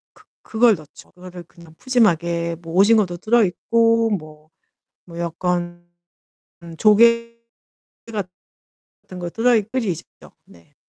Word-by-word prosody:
그 - - -22 0.2
그걸 225 0 +3
넣죠. 155 -3 -16
그거를 180 -1 -11
그냥 170 -1 -18
푸짐하게 170 -9 0
뭐 165 -1 -9
오징어도 200 -2 +3
들어 230 +4 +2
있고 230 +5 +1
뭐 155 -5 -7 0.6
뭐 170 -1 -10
약간 175 0 -3 0.8
음 165 -1 -10
조개 230 +3 +3 0.7
같은 190 -4 -7 0.7
거 175 -1 -5
들어이 230 0 +2
끓이죠. 220 -6 -3 0.4
네. 85 -1 -22
185 Hz, 220 characters per minute, -20 LUFS, 170-230 Hz, 0.8 s, 그걸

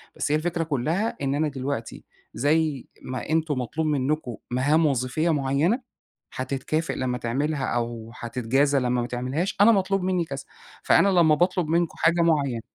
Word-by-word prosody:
بس 145 - -2
هي - - +4
الفكرة 165 +1 -1
كلّها 160 - -1
إن 135 0 0
أنا 155 +1 +1
دلوقتي 135 -4 -4 0.3
زي 150 -1 0
ما 130 +2 -6
أنتم 155 -4 0
مطلوب 155 +6 -2
منكم 140 -3 -1 0.2
مهام 145 +6 +3
وظيفية 140 +4 0
معيّنة 150 - 0 0.4
هتتكافئ 135 +5 -2
لمّا 125 -1 -2
تعملها 135 +4 -1
أو 115 -1 -3
هتتجازى 130 +4 +1
لمّا 125 -1 0
ما 120 - -3
تعملهاش، 130 +10 -2
أنا 230 +3 +8
مطلوب 195 -2 +1
مني 180 -2 0
كذا، 135 -3 -6 0.4
فأنا 200 - +5
لمّا 170 -5 +5
باطلب 180 0 +1
منكم 170 +1 0
حاجة 170 +1 +3
معيّنة 140 -8 +1
145 Hz, 155 wpm, -25 LUFS, 130-165 Hz, 0.4 s, أنا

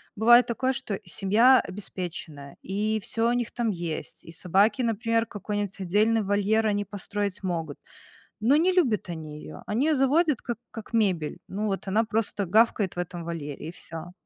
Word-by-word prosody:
бывает 240 +3 +6
такое, 255 +3 0
что 245 -7 -4
семья 220 +9 +4
обеспеченная, 175 -7 -7
и 215 +3 -1
всё 225 +3 0
у - - +2
них 245 -2 -1
там 235 -2 -1
есть, 170 -4 -5
и 165 - -10
собаки, 195 +8 +2
например, 230 0 +1
какой-нибудь 205 -1 -4
отдельный 210 +4 +2
вольер 205 +2 +2
они 205 -1 +1
построить 200 0 -4
могут. 165 -5 -3 0.6
Но 240 +7 +4
не 345 +4 +4
любят 250 - +1
они 155 -3 -6
её. - - -10
Они 245 +9 +1
её 310 - +3
заводят 280 +1 +2
как 240 - -4
как 225 0 -9
мебель. 185 -9 +1
Ну 205 +3 -3
вот 195 0 -3
она 215 +4 +3
просто 215 -2 -1
гавкает 210 -1 +3
в - - -4
этом 175 -1 -4
вольере 150 -4 -5
и 160 - -7
всё. 165 0 -8
205 Hz, 175 wpm, -26 LUFS, 180-230 Hz, 0.6 s, бывает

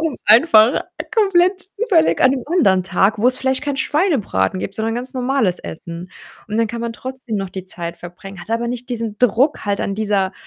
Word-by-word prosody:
um 320 -3 -2
einfach 225 0 +5 0.3
komplett 380 -3 +3 0.2
zufällig 400 -8 +2
an 255 - +5
'nem 265 -2 -2
anderen 240 - +3
Tag, 195 +3 +1
wo's 250 +4 +3
vielleicht 265 0 -1
keinen 285 -2 -2
Schweinebraten 265 - 0
gibt, 195 - -5
sondern 225 0 -2
ganz 245 +2 -3
normales 250 -7 +1
Essen. 170 +2 -8 0.4
Und 210 - -3
dann 230 -1 +1
kann 235 +2 -5
man 235 0 -3
trotzdem 255 -2 -6
noch 195 -2 -4
die 190 -1 -7
Zeit 170 -2 -4
verbringen, 175 +2 -11
hat 200 - -11
aber 230 +1 -1
nicht 245 +1 -6
diesen 230 -4 -4
Druck 250 +5 +2
halt 200 -1 0
an 200 - -2
dieser 200 -3 0
230 Hz, 195 wpm, -19 LUFS, 195-265 Hz, 0.4 s, einfach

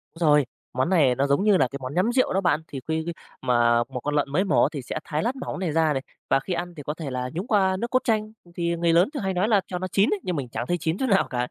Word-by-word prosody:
Rồi, 150 -4 +4 0.3
món 130 +6 0
này 150 -9 +4
nó 140 +3 +1
giống 140 +7 +2
như 205 -2 +5
là 135 - +3
cái 140 - -6
món 130 +1 -5
nhắm 185 +8 +2
rượu 255 +1 +2
đó 195 - +1
bạn, 160 -4 +2
thì 135 - -6
khi 160 0 -1
khi 170 - -3 0.3
mà 120 -2 +3
một 130 -1 -5
con 145 +4 -2
lợn 145 -1 +1
mới 175 +7 +2
mổ 200 - +3
thì 145 - -6
sẽ 125 - -5
thái 150 0 -2
lát 240 +4 -1
mỏng 260 - -5
này 180 -4 -1
ra 160 -1 +2
này, 135 - -2 0.3
và - - +4
khi 180 +7 -4
ăn 175 +1 -4
thì 145 - -7
có 150 - -3
thể 155 -3 -6
là 125 0 -3
nhúng 180 +7 -4
qua 190 -4 +2
nước 235 - -2
cốt 255 - +4
chanh, 215 -2 0 0.2
thì 170 -1 -1
người 170 0 +1
lớn 175 +7 +4
thường 280 - -4
hay 190 0 -1
nói 185 +3 +1
là 210 -3 +4
cho 180 - -4
nó 185 - -3
chín 195 +3 +2
ấy, 420 - -2
nhưng 180 - -2
mình 135 -3 -3
chẳng 115 +2 -3
thấy 175 - +1
chín 160 +3 -1
chỗ 265 - -1
nào 200 -6 +3
cả. 125 -1 -1
170 Hz, 320 wpm, -25 LUFS, 140-190 Hz, 0.3 s, như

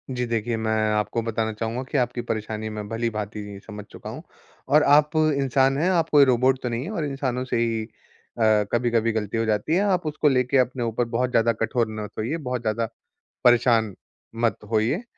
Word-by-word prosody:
जी 125 0 -1
देखिए, 115 0 -1
मैं 110 0 -1 0.2
आपको 105 +2 0
बताना 115 -1 -2
चाहूँगा 115 +3 -3
कि - - +1
आपकी 125 -1 0
परेशानी 110 0 -3
मैं 105 -1 -6
भली-भाँति 105 -3 -4
समझ 105 -1 -8
चुका - - -9
हूँ। - - -7 0.5
और 150 +1 +5
आप 150 +1 +5
इंसान 135 -3 +2
हैं, 170 +5 +1
आप 170 -3 +1
कोई 145 -2 +6
रोबोट 130 +1 +2
तो 125 - -1
नहीं 120 +1 -2
हैं, 180 - -5
और 165 -8 -2
इंसानों 130 -3 -2
से 125 - -1
ही 115 -1 0
अ, 110 -1 -1
कभी-कभी 115 -1 +1
गलती 110 0 -2
हो 115 - +1
जाती 110 +8 0
है। 190 - +3
आप 185 -5 +1
उसको 150 0 0
लेके 125 0 +2
अपने 125 -1 +1
ऊपर 115 +1 -1
बहुत 125 +1 +1
ज़्यादा 115 -1 +3
कठोर 115 0 +1
मत 105 - -5
होइए, 120 +10 -2
बहुत 125 -5 -3
ज़्यादा 115 0 -1 0.6
परेशान 115 -4 +4 0.5
मत 115 - +2
होइए। 115 - +1
120 Hz, 195 wpm, -24 LUFS, 110-135 Hz, 0.6 s, कोई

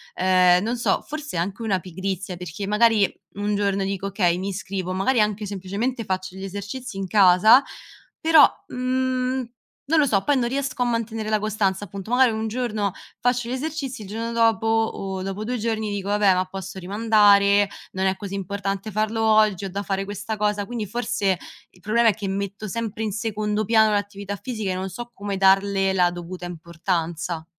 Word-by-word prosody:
ehm, 180 -1 +4
non 235 +3 -1
so, 235 - +1
forse 300 - -5
anche 190 +6 -2
una 200 -4 0
pigrizia, 190 +1 -4
perché 180 +3 -6
magari 210 -1 +4 0.3
un 205 +1 -1
giorno 200 -1 0
dico: 195 0 -3
"Okay, 180 -3 +1
mi 195 +2 -3
iscrivo," 190 -1 -4
magari 215 +5 +2
anche 210 0 0
semplicemente 205 +5 -3
faccio 185 -1 -3
gli 190 - -8
esercizi 205 +4 -6
in 195 -1 -3
casa, 200 +6 +6 0.6
però, 320 -3 +7 0.2
mhmm, 255 0 -1 0.4
non 315 +2 +3
lo 290 - +5
so, 200 -7 +1
poi 285 +2 +2
non 240 - +1
riesco 275 0 -2
a - - 0
mantenere 225 -2 -2
la 215 -1 +2
costanza 205 -2 0
appunto, 200 +3 -8
magari 250 -1 +5
un 220 0 -2
giorno 215 -4 -2 0.3
faccio 245 -1 0
gli - - -2
esercizi, 270 -4 -4
il - - -10
giorno 230 +3 -4
dopo 225 -1 +2
o 220 -4 -1
dopo 195 +2 -4
2 250 +3 -2
giorni 220 -1 -2
dico: 200 -1 -4
"Vabbè, 205 -2 +4
ma 185 0 +1
posso 190 0 -7
rimandare, 205 0 +4 0.3
non 190 0 -1
è 190 0 +2
così 200 0 -6
importante 195 +1 -3
farlo 215 +2 -1
oggi, 215 -3 +3
ho - - -4
da 200 +1 -3
fare 195 0 -2
questa 205 +2 -5
cosa," 210 -1 0
quindi 235 -2 -4
forse 220 -4 0 0.3
il - - -22
problema 230 +3 +3
è - - +2
che 205 -2 -5
metto 200 +2 -4
sempre 225 +1 -3
in 215 - -1
secondo 210 0 -2
piano 220 0 +4
l'attività 200 -1 -3
fisica 220 -6 -4
e - - -2
non 190 +1 -3
so 240 +6 -8
come 200 -2 -4
darle 195 0 +3
la 180 -2 +3
dovuta 175 +1 -7
importanza. 170 -1 -3
205 Hz, 185 wpm, -23 LUFS, 190-225 Hz, 0.6 s, però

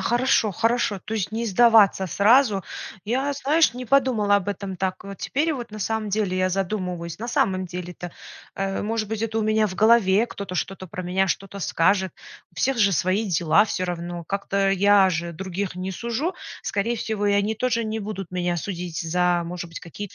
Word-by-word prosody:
хорошо, 240 -3 +2
хорошо. 225 -1 0
То 215 - -6
есть 215 -1 -2
не 230 +1 -2
сдаваться 215 -3 +5
сразу. 210 0 +4 0.4
Я, 265 +6 0
знаешь, 290 -1 +2
не 250 0 -6
подумала 230 -6 +3
об 200 0 -2
этом 200 -1 -4
так 185 +2 -3
вот. 200 -1 -8
Теперь 315 +4 0
вот 240 -5 -6
на 215 - -8
самом 220 +1 -2
деле 200 -2 0
я 185 0 +2
задумываюсь. 180 -3 -3
На 235 +2 -5
самом 195 -9 +1
деле-то, 180 0 -7 0.4
э, 195 0 -2
может 220 0 -1
быть, 220 -1 -3
это 225 0 -1
у 220 - +1
меня 215 0 +2
в 185 - -6
голове 215 0 +4
кто-то 200 -5 -7
что-то 185 +1 -3
про 180 +2 -6
меня 185 +2 +1
что-то 195 +2 -3
скажет, 190 +1 +1 0.4
у - - -27
всех 270 -2 0
же 200 -2 +5
свои 185 +6 +1
дела 180 +3 +3
всё 185 - -2
равно, 175 -1 -4
как-то 200 0 0
я 195 0 +5
же 170 0 -3
других 190 +2 -4
не 185 +1 -4
сужу, 235 - -2 0.3
скорее 230 +4 -1
всего, 210 -2 -2
и 205 - +3
они 205 +2 +1
тоже 230 0 0
не 220 +1 -3
будут 200 -3 -6
меня 175 -1 -1
судить 175 -2 -4
за, 175 +1 +1
может 175 0 -6
быть, 165 - -8
какие-то 185 +3 -8
200 Hz, 195 wpm, -24 LUFS, 185-225 Hz, 0.4 s, сдаваться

